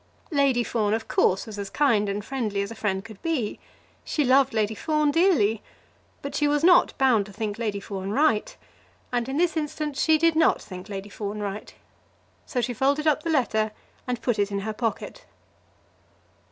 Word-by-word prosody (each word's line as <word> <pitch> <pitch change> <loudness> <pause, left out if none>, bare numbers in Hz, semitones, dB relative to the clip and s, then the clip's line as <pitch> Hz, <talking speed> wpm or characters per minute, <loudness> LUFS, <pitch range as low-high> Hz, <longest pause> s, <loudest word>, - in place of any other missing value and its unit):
Lady 275 -5 +2
Fawn, 215 -3 0
of 225 - -5
course, 190 - +2
was 210 -2 -8
as 200 -1 -4
kind 225 -8 +2
and 200 +1 -3
friendly 215 -7 -2
as 200 - -6
a - - -7
friend 195 -3 -2
could 220 -3 -12
be. 300 -11 -2 0.4
She 300 - 0
loved 265 +1 +4
Lady 220 -2 0
Fawn 305 +4 +1
dearly. 285 - +3 0.6
But 280 - -5
she 295 - +1
was 295 +1 +1
not 360 +1 +5
bound 245 -7 +3
to - - -11
think 210 +1 -4
Lady 210 -4 -2
Fawn 195 -1 -6
right, 260 -1 +1 0.5
and 245 0 -1
in 270 - -2
this 340 0 +2
instance 300 -2 -3
she 315 -1 +4
did 330 0 +3
not 320 0 +4
think 185 +1 -10
Lady 200 0 -6
Fawn 205 0 -5
right. 205 0 -5 0.7
So 250 -4 -1
she 245 +1 -2
folded 280 +6 +1
up 305 -1 +3
the 330 - -4
letter 220 -8 +1 0.3
and 245 -1 -3
put 235 -4 0
it 205 0 +1
in 200 0 -2
her 215 +2 -3
pocket. 235 - -4
235 Hz, 190 wpm, -25 LUFS, 205-290 Hz, 0.7 s, not